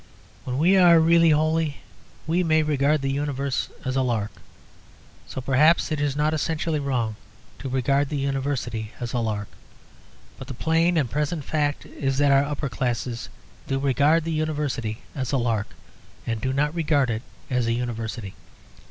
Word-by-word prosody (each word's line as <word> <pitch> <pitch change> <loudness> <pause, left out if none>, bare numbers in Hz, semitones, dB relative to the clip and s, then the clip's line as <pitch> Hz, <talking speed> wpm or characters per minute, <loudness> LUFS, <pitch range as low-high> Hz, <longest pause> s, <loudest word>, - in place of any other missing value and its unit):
When 125 0 -2
we 180 +6 +4
are 175 -3 +7
really 165 +1 +5
holy 155 0 +2 0.5
we 170 +3 +1
may 160 -2 +3
regard 150 0 +1
the 135 - 0
Universe 140 -1 -2 0.2
as 130 0 -1
a 135 - +2
lark; 115 -5 -1 1.0
so 130 - -5
perhaps 150 +7 +3
it 155 -2 -1
is 145 -2 0
not 150 +1 +1
essentially 160 0 -1
wrong 120 -6 -1 0.4
to 135 - -5
regard 135 +2 +1
the 150 - -2
University 135 -5 -2
as 120 -1 -4
a 125 - +1
lark. 105 -3 -2 0.9
But 135 - -8
the 135 - -6
plain 165 +5 +2
and 145 -5 +2
present 150 +5 -2
fact 145 -2 -1
is 135 -1 -2
that 145 0 +4
our 135 0 +5
upper 145 -1 -3
classes 120 0 -3 0.4
do 135 - 0
regard 140 +4 +3
the 165 - -3
University 145 -8 -2
as 130 -4 -3
a 135 - +2
lark, 115 -4 0 0.6
and 115 -2 -2
do 130 - -1
not 150 +3 +1
regard 145 -6 +1
it 110 0 -2 0.3
as 125 -2 +1
a 115 - +2
University. 115 -4 -4
140 Hz, 170 wpm, -24 LUFS, 125-155 Hz, 1.0 s, are